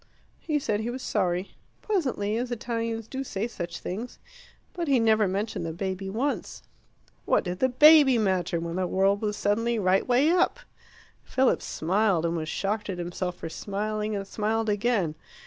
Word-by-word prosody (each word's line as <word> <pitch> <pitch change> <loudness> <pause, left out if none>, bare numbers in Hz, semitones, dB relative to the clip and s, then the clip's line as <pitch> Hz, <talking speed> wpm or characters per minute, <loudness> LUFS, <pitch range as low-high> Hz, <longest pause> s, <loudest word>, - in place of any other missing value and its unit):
"He 305 -2 -1
said 215 -7 -1
he 220 +2 -3
was 255 +1 -5
sorry 185 -4 -1 0.3
pleasantly, 260 - 0
as 245 +2 -2
Italians 230 -1 -3
do 265 +2 -4
say 215 -4 -3
such 175 -7 -6
things. 220 +7 -6 0.6
But 345 -2 -3
he 270 -3 +4
never 220 -2 +3
mentioned 200 0 -2
the 165 -1 -4
baby 190 +2 -4
once." 255 +8 -3 0.6
What - - +2
did 180 -1 -4
the 260 - +3
baby 290 0 +7
matter 185 -5 0
when 170 +1 -4
the 185 -1 0
world 195 +2 +2
was 210 -1 -2
suddenly 230 +3 +1
right 190 -2 +2
way 260 +6 +4
up? 365 +7 +2 0.6
Philip 260 0 +2
smiled, 185 0 +1
and 170 0 0
was 160 -1 -3
shocked 210 +3 -2
at 185 - -3
himself 175 +1 -3
for 165 - -7
smiling, 210 +3 -3
and 200 -1 -3
smiled 220 +2 -1
again. 205 -6 +1
210 Hz, 170 wpm, -27 LUFS, 185-240 Hz, 0.6 s, baby